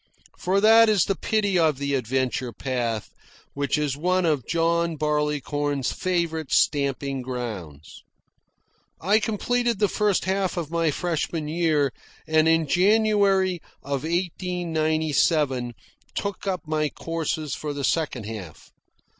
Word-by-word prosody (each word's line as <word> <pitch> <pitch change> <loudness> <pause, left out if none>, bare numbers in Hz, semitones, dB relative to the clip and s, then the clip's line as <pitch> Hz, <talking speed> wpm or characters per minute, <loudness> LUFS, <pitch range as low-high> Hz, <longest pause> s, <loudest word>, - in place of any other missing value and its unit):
For 190 +2 +1
that 225 +2 +7
is 205 -5 +4
the 195 - 0
pity 205 -2 +1
of 155 -4 +3
the 140 0 -2
adventure 130 0 -1
path, 115 -2 -3 0.4
which 140 +1 0
is 150 -3 -1
one 180 +4 +1
of 150 -7 0
John 170 0 +1
Barleycorn's 145 -2 -1
favourite 170 -4 -2
stamping 140 -2 +1
grounds. 105 - -7 1.0
I 205 +5 +3
completed 235 +2 0
the 205 - +3
first 205 -2 +1
half 190 -1 -1
of 165 -3 -3
my 165 -1 +1
freshman 160 0 -2
year, 155 -4 +1 0.3
and 155 0 +3
in 165 0 +3
January 195 0 +3 0.2
of 140 -1 -2
1897 160 -6 0 0.4
took 200 0 -4
up 185 -2 -1
my 155 -1 0
courses 160 -2 -3
for 150 - -4
the 145 -1 -4
second 135 -4 0
half. 105 -7 -9
160 Hz, 125 wpm, -24 LUFS, 140-185 Hz, 1.0 s, that